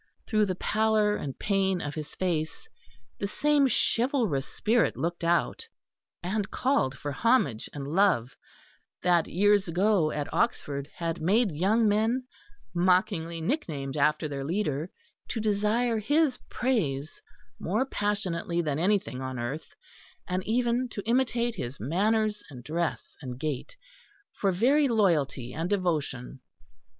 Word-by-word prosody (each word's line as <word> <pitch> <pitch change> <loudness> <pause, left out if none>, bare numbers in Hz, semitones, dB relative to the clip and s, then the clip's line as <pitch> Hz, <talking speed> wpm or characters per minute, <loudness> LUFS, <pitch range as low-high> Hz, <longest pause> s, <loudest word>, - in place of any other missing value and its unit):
Through 215 -2 +2
the 185 - -1
pallor 215 +1 +2
and 135 -8 -5
pain 195 -2 +1
of 145 -3 -4
his 155 -1 -7
face, 160 -4 -2 0.5
the 200 - -1
same 290 +5 +3
chivalrous 230 - +1
spirit 230 +1 +1
looked 170 +1 -2
out 170 - +1 0.6
and 200 +3 -1
called 250 - +1
for 145 - -4
homage 140 - +1
and 140 -2 -6
love, 165 - +2 0.7
that 175 -2 +3
years 205 +2 +3
ago 180 -1 +2
at 150 -1 -4
Oxford 145 -11 -1
had 165 -1 -3
made 200 +5 +3
young 205 +9 +2
men, 220 +5 +1 0.5
mockingly 175 -2 +1
nicknamed 160 - -2
after 150 +2 +2
their 140 -2 -4
leader, 160 -1 -1 0.4
to 230 - -3
desire 215 +2 +1
his 290 +3 +2
praise 155 - -1 0.4
more 215 +9 0
passionately 195 -7 -1
than 150 -3 -1
anything 190 -7 0
on 130 -1 -4
earth, 135 +7 -5 0.5
and 185 +1 -1
even 240 +2 +1
to 205 -4 -6
imitate 240 -1 +1
his 125 -3 -5
manners 210 - +1
and 125 -4 -10
dress 165 +4 -3
and 125 -3 -6
gait, 150 - -4 0.6
for 195 - +1
very 270 +10 +3
loyalty 160 - +1
and 165 +3 -2
devotion. 150 -10 -1
185 Hz, 130 wpm, -28 LUFS, 150-220 Hz, 0.7 s, same